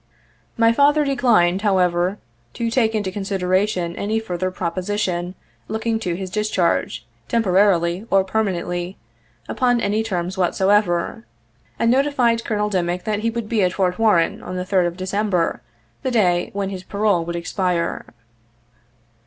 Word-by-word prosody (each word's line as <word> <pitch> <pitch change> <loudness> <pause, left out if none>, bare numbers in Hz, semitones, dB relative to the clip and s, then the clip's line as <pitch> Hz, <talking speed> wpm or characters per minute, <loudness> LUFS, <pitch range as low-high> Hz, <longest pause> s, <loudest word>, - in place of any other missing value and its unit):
My 230 0 +4
father 290 +3 +4
declined, 230 -10 +3
however, 185 -2 +1 0.4
to 230 -1 -2
take 225 -3 +2
into 205 -3 -1
consideration 185 -2 -1
any 215 +2 -1
further 185 -4 -3
proposition 185 0 -2 0.3
looking 220 +1 -1
to 180 -6 -2
his 185 0 -6
discharge, 190 - 0 0.2
temporarily 190 -3 +2
or 195 -1 +4
per 220 +4 0
manently, 175 -1 -3 0.5
upon 245 -2 +1
any 210 0 0
terms 190 -3 -3
whatsoever, 180 - +1 0.5
and 230 - +2
notified 255 -4 +2
Col. 210 -2 -1
Dimick 180 -1 -1
that 210 -1 -1
he 230 +2 0
would 230 -1 -4
be 220 -1 +1
at 180 -1 +2
Fort 185 -1 0
Warren 210 -7 +2
on 185 - -6
the 180 0 -3
3d 185 -2 +2
of 175 0 -6
December, 190 -2 -1 0.4
the - - -1
day 180 -8 +2
when 200 -1 -3
his 185 -2 -5
parole 200 -2 0
would 170 +1 -5
expire. 175 0 -2
195 Hz, 145 wpm, -21 LUFS, 180-220 Hz, 0.5 s, My